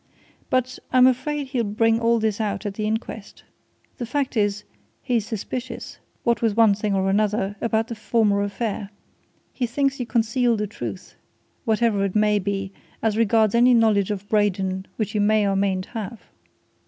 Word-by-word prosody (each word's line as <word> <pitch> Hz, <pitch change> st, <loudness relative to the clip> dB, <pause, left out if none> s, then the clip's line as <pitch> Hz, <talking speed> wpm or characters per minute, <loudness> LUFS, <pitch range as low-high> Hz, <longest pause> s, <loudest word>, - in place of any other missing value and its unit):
"But 255 Hz, 0 st, 0 dB
I'm 255 Hz, -1 st, +6 dB
afraid 265 Hz, +2 st, 0 dB
he'll 255 Hz, -3 st, 0 dB
bring 225 Hz, +2 st, +2 dB
all 235 Hz, 0 st, +3 dB
this 220 Hz, -1 st, 0 dB
out 210 Hz, 0 st, -2 dB
at 205 Hz, -, -2 dB
the 215 Hz, +1 st, -2 dB
inquest. 220 Hz, -1 st, -5 dB, 0.5 s
The 240 Hz, -, -4 dB
fact 275 Hz, +1 st, -1 dB
is 205 Hz, -1 st, 0 dB, 0.4 s
he's 235 Hz, -5 st, 0 dB
suspicious 240 Hz, +4 st, -5 dB, 0.2 s
what 235 Hz, -3 st, +1 dB
with 225 Hz, -2 st, +1 dB
one 225 Hz, -3 st, +6 dB
thing 205 Hz, 0 st, -1 dB
or 190 Hz, 0 st, +1 dB
another 205 Hz, 0 st, +1 dB
about 225 Hz, -1 st, 0 dB
the 235 Hz, -, -5 dB
former 215 Hz, -3 st, +1 dB
affair. 205 Hz, 0 st, -3 dB, 0.6 s
He 245 Hz, -, -1 dB
thinks 275 Hz, +3 st, 0 dB
you 245 Hz, -, -3 dB
concealed 235 Hz, 0 st, +1 dB
the 210 Hz, -, -1 dB
truth 120 Hz, -, -7 dB, 0.5 s
whatever 220 Hz, -2 st, +2 dB
it 195 Hz, 0 st, -2 dB
may 210 Hz, -1 st, +3 dB
be 195 Hz, 0 st, -3 dB, 0.3 s
as 220 Hz, -2 st, +1 dB
regards 220 Hz, -1 st, +3 dB
any 245 Hz, +1 st, +5 dB
knowledge 215 Hz, -4 st, +3 dB
of 200 Hz, -1 st, -4 dB
Braden 190 Hz, -3 st, 0 dB
which 215 Hz, -1 st, -3 dB
you 210 Hz, -, +1 dB
may 210 Hz, 0 st, +3 dB
or 195 Hz, -, +1 dB
mayn't 190 Hz, -1 st, 0 dB
have." 225 Hz, 0 st, -6 dB
215 Hz, 170 wpm, -23 LUFS, 200-235 Hz, 0.6 s, I'm